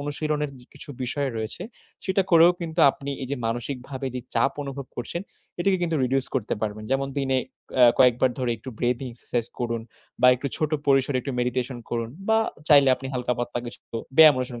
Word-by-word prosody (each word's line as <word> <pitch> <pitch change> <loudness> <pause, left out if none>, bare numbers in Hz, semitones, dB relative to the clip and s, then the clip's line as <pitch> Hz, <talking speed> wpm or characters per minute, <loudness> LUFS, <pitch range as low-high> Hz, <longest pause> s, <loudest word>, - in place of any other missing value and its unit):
অনুশীলনের 150 0 -2 0.2
কিছু - - -12
বিষয় 135 +3 -1
রয়েছে, 110 +10 -4 0.4
সেটা 190 0 +2
করেও 170 +1 +8
কিন্তু 165 0 -2
আপনি 140 +1 -7
এই 130 - -5
যে 140 - -1
মানসিকভাবে 130 +3 -4 0.3
চাপ 135 - +2
অনুভব 140 -1 -6
করছেন, 170 +9 -4 0.4
এটিকে 190 0 +2
কিন্তু 165 -2 0
রিডিউস 130 +1 0
করতে 115 -5 0
পারবেন। 110 0 -3
যেমন 135 0 +1
দিনে 135 -1 +1 0.4
এ - - +9
কয়েকবার 125 0 +5
ধরে 125 -2 0
একটু 120 +5 -11
ব্রেথিং 125 +2 0
এক্সারসাইজ 120 0 -3
করুন 115 -1 -1 0.4
বা 125 - +6
একটু 130 +3 -5
ছোট 155 -1 -1 0.2
পরিসরে 135 -1 +3
একটু 135 - -5
মেডিটেশন 125 0 -2
করুন 115 -1 -2 0.2
বা 220 - +5 0.3
চাইলে 140 -3 +7
আপনি 135 - -7
হালকা 125 0 0
পাতলা 120 0 -2
কিছু 120 - -9 0.4
ব্যায়াম 155 -3 +9
অনুসরণ 125 -2 -4
135 Hz, 175 wpm, -25 LUFS, 120-145 Hz, 0.4 s, এ